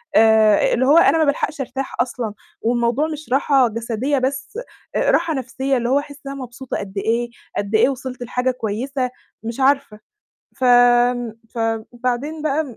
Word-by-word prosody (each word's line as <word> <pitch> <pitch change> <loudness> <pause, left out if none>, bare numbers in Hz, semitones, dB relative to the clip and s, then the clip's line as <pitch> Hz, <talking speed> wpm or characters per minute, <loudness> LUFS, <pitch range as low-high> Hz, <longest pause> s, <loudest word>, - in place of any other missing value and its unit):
آآ 220 -1 +5
اللي 260 - +2
هو 290 +5 +5
أنا 335 - +5
ما 320 - +3
بالحقش 295 0 -1
أرتاح 270 +1 -5
أصلًا 240 -3 -3 0.3
والموضوع 240 +5 +1
مش 305 -2 -7
راحة 270 -2 +4
جسدية 235 +5 -2
بس، 270 - -3 0.4
راحة 325 - +2
نفسية 265 0 -1
اللي 240 0 -1
هو 275 - +3
أحسّ 285 0 -10
إن - - -4
أنا 275 -1 -7
مبسوطة 250 +1 -6
قد 200 0 -7
إيه، 230 +4 0 0.3
قد 205 +2 -1
إيه 220 +4 +5
وصلت 260 -2 -5
لحاجة 250 +1 -1
كويسة، 250 +3 -3 0.3
مش 230 +3 -5
عارفة 270 -5 +1 0.6
ف 260 - -3
ن 245 -1 +4 0.2
فبعدين 240 +6 -2
بقى 305 +1 0
م 250 -6 -11
250 Hz, 165 wpm, -20 LUFS, 235-275 Hz, 0.6 s, آآ